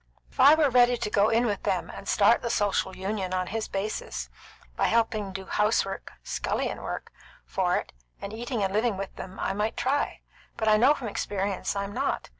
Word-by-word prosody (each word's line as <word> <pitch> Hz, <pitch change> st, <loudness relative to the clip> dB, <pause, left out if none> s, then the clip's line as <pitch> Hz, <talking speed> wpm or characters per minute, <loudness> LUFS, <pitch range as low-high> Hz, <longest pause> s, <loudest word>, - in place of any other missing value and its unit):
If -, -, -21 dB
I 280 Hz, +4 st, +9 dB
were 305 Hz, -4 st, +3 dB
ready 245 Hz, 0 st, +5 dB
to 210 Hz, -, -2 dB
go 205 Hz, +1 st, +4 dB
in 230 Hz, +2 st, +3 dB
with 205 Hz, -4 st, -1 dB
them -, -, -1 dB
and -, -, -10 dB
start -, -, +4 dB
the 235 Hz, -, -2 dB
Social 205 Hz, -3 st, 0 dB
Union 190 Hz, -1 st, -2 dB
on 185 Hz, 0 st, 0 dB
his 220 Hz, +4 st, -3 dB
basis, 200 Hz, +2 st, -4 dB, 0.4 s
by -, -, +1 dB
helping 225 Hz, -3 st, +1 dB
do 190 Hz, 0 st, -6 dB
house 210 Hz, +2 st, +2 dB
work 195 Hz, -, -7 dB
scullion -, -, -2 dB
work -, -, -5 dB, 0.3 s
for -, -, 0 dB
it, -, -, -5 dB, 0.3 s
and 200 Hz, -, -6 dB
eating 235 Hz, -1 st, -2 dB
and 190 Hz, 0 st, -1 dB
living 215 Hz, -1 st, +1 dB
with 195 Hz, 0 st, -6 dB
them, 190 Hz, 0 st, -8 dB
I 190 Hz, -, -1 dB
might 210 Hz, +3 st, -1 dB
try; 265 Hz, +4 st, 0 dB, 0.4 s
but 220 Hz, -, -1 dB
I 215 Hz, -, +6 dB
know 260 Hz, +7 st, +5 dB
from 255 Hz, -5 st, -5 dB
experience 200 Hz, -1 st, -2 dB
I'm 200 Hz, 0 st, -3 dB
not. -, -, -2 dB
210 Hz, 205 wpm, -27 LUFS, 195-235 Hz, 0.4 s, I